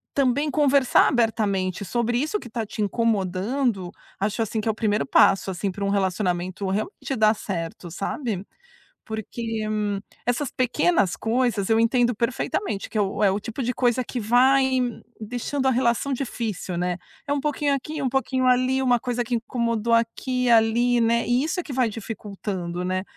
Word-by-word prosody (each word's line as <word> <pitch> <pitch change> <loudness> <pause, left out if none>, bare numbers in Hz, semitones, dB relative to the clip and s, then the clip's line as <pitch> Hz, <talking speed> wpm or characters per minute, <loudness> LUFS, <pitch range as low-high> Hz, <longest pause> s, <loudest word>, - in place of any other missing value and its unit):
também 280 +2 +2
conversar 280 -3 +4
abertamente 205 -6 0
sobre 240 +3 0
isso 310 +8 -1
que 240 - -10
tá 225 0 -3
te 215 - -5
incomodando, 205 0 0 0.3
acho 210 +3 -1
assim 220 0 -1
que 220 - -1
é - - +4
o - - -8
primeiro 210 -1 +1
passo, 195 -6 +4
assim, 190 +2 -2
pra 200 +2 -6
um - - 0
relacionamento 185 -1 -1
realmente 240 - -3
dar 215 0 +5
certo, 175 -4 -5
sabe. 205 - -3 0.6
Porque, 220 +1 -4 0.6
essas 245 +3 0
pequenas 255 - +1
coisas, 225 -3 0
eu 225 0 +4
entendo 240 +1 +3
perfeitamente 235 - -2
que 220 - -2
é - - +4
o 200 +1 -2
é 195 - +5
o 195 +2 -1
tipo 230 +5 -5
de 250 - 0
coisa 245 0 +1
que 245 - -4
vai 255 +5 +4 0.5
deixando 245 +5 -3
a - - +5
relação 245 +2 +1
difícil, 225 -8 -3
né. 180 0 -1 0.3
É - - +1
pouquinho 290 0 0
aqui 300 +3 -4
um 265 - +1
pouquinho 260 0 0
ali, 255 +1 +3
uma 245 -2 +3
coisa 245 -1 -2
que 240 - -2
incomodou 230 -1 0
aqui, 250 +2 0
ali, 235 +2 +4
né. 235 0 +2
E 245 +2 +2
isso 320 +4 -2
é - - -4
que 285 - -7
vai 255 -2 +2
dificultando, 195 -5 -5
né, 185 0 -1
230 Hz, 170 wpm, -24 LUFS, 205-255 Hz, 0.6 s, dar